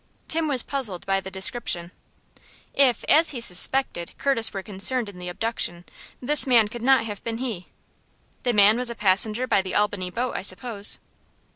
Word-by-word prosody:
Tim 325 Hz, 0 st, 0 dB
was 265 Hz, -5 st, +3 dB
puzzled 230 Hz, -11 st, -2 dB
by 195 Hz, 0 st, 0 dB
the 190 Hz, -, -9 dB
description. 190 Hz, -3 st, +1 dB, 0.8 s
If, 260 Hz, -5 st, +2 dB
as 320 Hz, +2 st, +4 dB
he 260 Hz, -, -3 dB
suspected, 180 Hz, -2 st, 0 dB
Curtis 270 Hz, -5 st, +3 dB
were 195 Hz, -1 st, -6 dB
concerned 220 Hz, +4 st, 0 dB
in 185 Hz, -3 st, -13 dB
the 180 Hz, 0 st, -7 dB
abduction, 175 Hz, -3 st, -3 dB, 0.3 s
this 295 Hz, +3 st, +4 dB
man 230 Hz, -5 st, +3 dB
could 235 Hz, +2 st, -9 dB
not 260 Hz, -2 st, +3 dB
have 205 Hz, -3 st, -8 dB
been 230 Hz, -1 st, -4 dB
he. 230 Hz, -8 st, -6 dB, 0.7 s
"The 245 Hz, -, -1 dB
man 210 Hz, +1 st, +4 dB
was 250 Hz, 0 st, -2 dB
a 235 Hz, -, -6 dB
passenger 210 Hz, +4 st, +1 dB
by 200 Hz, -, +1 dB
the 190 Hz, -1 st, -7 dB
Albany 205 Hz, -3 st, -1 dB
boat, 245 Hz, +7 st, -4 dB
I -, -, -3 dB
suppose?" 200 Hz, +2 st, -1 dB
225 Hz, 175 wpm, -23 LUFS, 190-250 Hz, 0.8 s, as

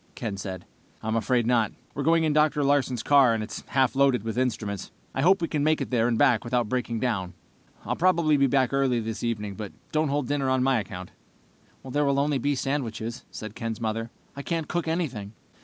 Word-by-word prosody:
Ken 110 Hz, -5 st, -4 dB
said. 95 Hz, -2 st, -6 dB, 0.4 s
"I'm 110 Hz, 0 st, -1 dB
afraid 120 Hz, +1 st, +1 dB
not. 115 Hz, -3 st, +2 dB, 0.2 s
We're 140 Hz, -, -3 dB
going 165 Hz, +2 st, +3 dB
in 155 Hz, -2 st, +2 dB
Dr. 150 Hz, -1 st, +3 dB
Larsen's 135 Hz, -4 st, +1 dB
car, 135 Hz, -5 st, +5 dB
and 110 Hz, -, -2 dB
it's 110 Hz, -, -6 dB
half 130 Hz, -3 st, +2 dB
loaded 135 Hz, -5 st, +3 dB
with 115 Hz, -1 st, -3 dB
instruments. 110 Hz, -6 st, -2 dB, 0.2 s
I 135 Hz, -, -1 dB
hope 180 Hz, +3 st, +4 dB
we 160 Hz, -2 st, -1 dB
make 155 Hz, +2 st, +2 dB
it -, -, -4 dB
there 120 Hz, -2 st, +2 dB
and 120 Hz, -2 st, +1 dB
back 125 Hz, -5 st, +4 dB
without 120 Hz, -1 st, 0 dB
breaking 120 Hz, -1 st, -2 dB
down. 100 Hz, -8 st, -2 dB, 0.5 s
"I'll -, -, -1 dB
probably 170 Hz, -4 st, +3 dB
be 140 Hz, -1 st, +4 dB
back 130 Hz, -1 st, +2 dB
early 135 Hz, -3 st, +2 dB
this 115 Hz, -1 st, -4 dB
evening, 105 Hz, -4 st, -2 dB
but 105 Hz, 0 st, -7 dB, 0.2 s
don't 155 Hz, -1 st, +1 dB
hold 140 Hz, -2 st, -1 dB
dinner 140 Hz, -2 st, 0 dB
on 130 Hz, -1 st, +2 dB
my 130 Hz, -2 st, +3 dB
account." 90 Hz, -2 st, -7 dB, 0.8 s
"There 145 Hz, +3 st, 0 dB
will 140 Hz, -1 st, +2 dB
be 145 Hz, +1 st, +1 dB
only 140 Hz, +2 st, 0 dB
sandwiches," 120 Hz, -4 st, -3 dB
said 110 Hz, -1 st, -7 dB
Ken's 115 Hz, -1 st, -4 dB
mother. 115 Hz, 0 st, -2 dB, 0.3 s
"I 140 Hz, -, -5 dB
can't 165 Hz, +1 st, -2 dB
cook 175 Hz, -2 st, -2 dB
anything." 130 Hz, -, -2 dB
130 Hz, 205 wpm, -26 LUFS, 115-145 Hz, 0.8 s, car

